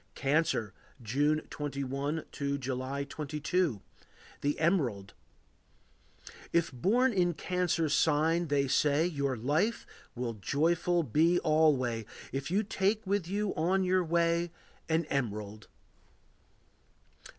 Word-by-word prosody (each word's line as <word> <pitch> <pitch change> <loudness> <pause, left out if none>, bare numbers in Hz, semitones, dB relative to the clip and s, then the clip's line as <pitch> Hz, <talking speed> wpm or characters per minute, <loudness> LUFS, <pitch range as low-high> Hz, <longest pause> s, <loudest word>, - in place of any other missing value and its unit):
Cancer. 135 - +1 0.3
June 145 +7 +1
21 140 +1 -3
to 140 0 -2
July 130 +1 -3
22. 150 - -2 0.6
The 145 +1 -1
Emerald. 130 - 0 1.4
If 170 -1 +2
born 225 - +2
in 175 -3 +2
Cancer's 175 -3 0
sign, 160 +3 +2
they 140 -1 +1
say, 145 +3 +3
Your 140 -6 -1
life 150 - 0 0.3
will 120 -1 -3
joyful 165 - +1
be 160 +7 +3
alway, 130 -8 +2 0.2
If 135 +2 -3
you 200 +5 +1
take 205 +2 0
with 195 -3 0
you 200 +2 -1
on 185 +4 +1
your 185 0 +2
way 170 +1 +1 0.4
An 160 0 +2
emerald. 105 -6 -3
155 Hz, 105 wpm, -31 LUFS, 135-175 Hz, 1.4 s, say